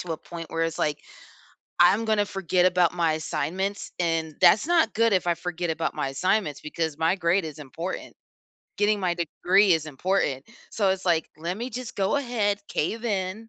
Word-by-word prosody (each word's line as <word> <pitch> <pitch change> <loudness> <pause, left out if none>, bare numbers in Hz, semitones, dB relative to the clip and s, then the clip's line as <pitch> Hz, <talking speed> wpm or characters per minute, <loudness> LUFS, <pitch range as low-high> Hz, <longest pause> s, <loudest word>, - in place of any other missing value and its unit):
to 175 - -4
a - - -3
point 165 +1 -9
where 165 - -1
it's, 165 - -3
like, 150 -1 0 0.8
"I'm 185 +6 +5
gonna 215 -2 +2
forget 185 -3 0
about 180 -2 +3
my 170 -2 +2
assignments," 170 +6 -3
and 165 -3 -1
that's 215 +6 +6
not 335 -9 +2
good 230 0 +3
if 185 -2 +1
I 175 - +3
forget 175 0 -4
about 160 0 -2
my - - -2
assignments 150 +2 0
because 160 -1 -3
my 165 +2 +2
grade 175 +1 +1
is 155 -1 -7
important. 155 +6 -6 0.6
Getting 205 0 +2
my 180 -2 0
degree 185 +3 +3
is 160 -2 +1
important. 150 -2 -1 0.3
So 200 -3 +1
it's, 190 0 -3
like, 165 -2 +2
"Let 170 +4 -3
me 245 +3 -5
just 250 0 -7
go 195 +6 +1
ahead, 225 -7 0
cave 225 +9 -2
in. 205 +1 -2
180 Hz, 185 wpm, -25 LUFS, 160-205 Hz, 0.8 s, that's